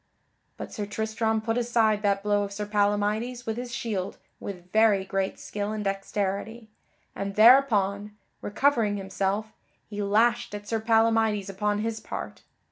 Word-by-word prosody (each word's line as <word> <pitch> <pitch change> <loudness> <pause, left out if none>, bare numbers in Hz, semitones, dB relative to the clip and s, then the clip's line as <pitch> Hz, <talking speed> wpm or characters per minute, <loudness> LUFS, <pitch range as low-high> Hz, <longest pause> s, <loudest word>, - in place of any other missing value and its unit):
But - - -7
Sir 205 -2 -4
Tristram 220 +1 -1
put 225 +2 -1
aside 225 -3 +2
that 200 -1 +1
blow 205 -1 +2
of 200 -1 -3
Sir 205 +1 -4
Palamydes 210 +4 0
with 220 - -2
his 245 +1 -6
shield 225 -7 -3 0.2
with 180 -2 -8
very 215 -3 +4
great 195 0 -2
skill 205 0 -4
and 215 -1 -3
dexterity, 200 +3 -3 0.4
and 195 0 -4
thereupon, 210 -4 +4 0.2
recovering 225 -3 +1
himself, 195 +2 -2 0.4
he 205 0 -4
lashed 230 +3 +2
at 205 0 -8
Sir 225 +1 -1
Palamydes 225 -2 +2
upon 205 +2 -1
his 225 0 -2
part. - - -7
210 Hz, 145 wpm, -26 LUFS, 200-225 Hz, 0.4 s, very